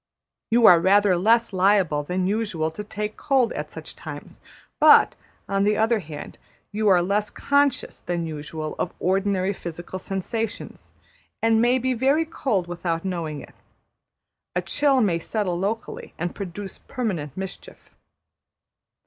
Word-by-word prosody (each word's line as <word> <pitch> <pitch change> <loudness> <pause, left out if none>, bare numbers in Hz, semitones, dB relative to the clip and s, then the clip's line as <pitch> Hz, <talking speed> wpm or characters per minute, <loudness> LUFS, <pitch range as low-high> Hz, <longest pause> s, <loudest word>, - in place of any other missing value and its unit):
You 235 0 +4
are 175 -2 +9
rather 195 +2 +4
less 225 +5 +3
liable 185 -5 +3
than 180 +5 -2
usual 195 -6 -1
to 210 +6 -7
take 210 +1 -5
cold 260 -4 +2
at - - -5
such - - -9
times; - - -9 0.4
but, - - +7 0.3
on 195 0 +1
the 210 +1 +2
other 225 +1 +2
hand, 155 -5 -9 0.3
you 215 +1 0
are 180 -3 +5
less 205 +3 0
conscious 285 -2 0
than 175 -1 -2
usual 155 0 -5
of - - -2
ordinary 195 +1 +1
physical 175 +1 -7
sensations, 205 +4 -5 0.5
and 225 0 +4
may 245 +2 +4
be 260 +1 0
very 275 +7 +2
cold 260 - -1
without 170 0 -3
knowing 165 -5 -3
it. - - -14 1.0
A - - 0
chill 280 -3 +2
may 180 -6 +2
settle 180 -1 -2
locally, 215 +4 -4
and 175 +1 -3
produce 195 0 -7
permanent 185 - -4
mischief. 190 0 -8
195 Hz, 140 wpm, -24 LUFS, 175-225 Hz, 1.0 s, are